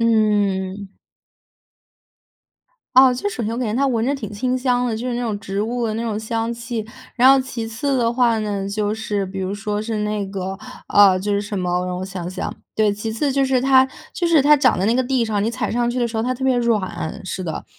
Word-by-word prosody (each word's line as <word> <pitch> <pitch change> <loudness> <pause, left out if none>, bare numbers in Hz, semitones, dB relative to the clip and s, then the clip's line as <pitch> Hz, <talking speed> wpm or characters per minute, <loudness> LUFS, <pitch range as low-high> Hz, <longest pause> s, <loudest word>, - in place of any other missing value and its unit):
嗯。 205 -4 +1 2.1
啊， 260 0 +8
就 330 +11 -2
是 410 - -7
首 240 - -3
先 220 - -2
我 - - -4
感 245 -3 -1
觉 - - -2
它 275 +2 +2
闻 230 -4 0
着 275 - +1
挺 215 -6 -7
清 250 +5 -1
香 250 -1 +1
的， 235 -3 -1
就 240 +3 -4
是 245 - -2
那 240 - -2
种 220 -4 -2
植 200 0 -3
物 235 +1 -1
的 215 - -2
那 225 - -2
种 220 -3 -2
香 225 +1 -2
气。 235 -1 -4 0.3
然 255 +2 +6
后 275 - +5
其 250 -3 -5
次 245 +5 -1
的 235 -1 +1
话 240 -2 +2
呢， 200 -2 -2
就 210 0 -1
是 210 -2 -2
比 190 +1 -7
如 190 +1 -2
说 205 0 -3
是 220 0 -3
那 210 -1 -2
个 190 0 -5 0.3
啊， 200 -2 +6
就 200 +3 -2
是 200 - +1
什 205 0 -5
么， 180 0 -1
让 180 - -3
我 185 - -4
想 185 -2 -6
想， 185 +1 -4 0.2
对， 215 -1 +2
其 215 +2 -4
次 275 +5 0
就 275 0 +2
是 260 -1 +2
它 265 0 +5 0.2
就 360 -4 -1
是 330 -4 +4
它 295 +2 +6
长 255 -4 +3
在 190 - +1
那 230 - +3
个 255 +1 +1
地 250 -2 +1
上， 210 -2 -1
你 215 - +1
踩 235 -2 -2
上 240 +1 0
去 245 +1 -1
的 240 - +1
时 225 - -6
候 220 - 0
它 255 +2 -1
特 260 - -9
别 260 -1 +3
软， 210 -7 -1
是 190 0 -4
的， 160 - -4
225 Hz, 265 characters per minute, -21 LUFS, 205-250 Hz, 2.1 s, 啊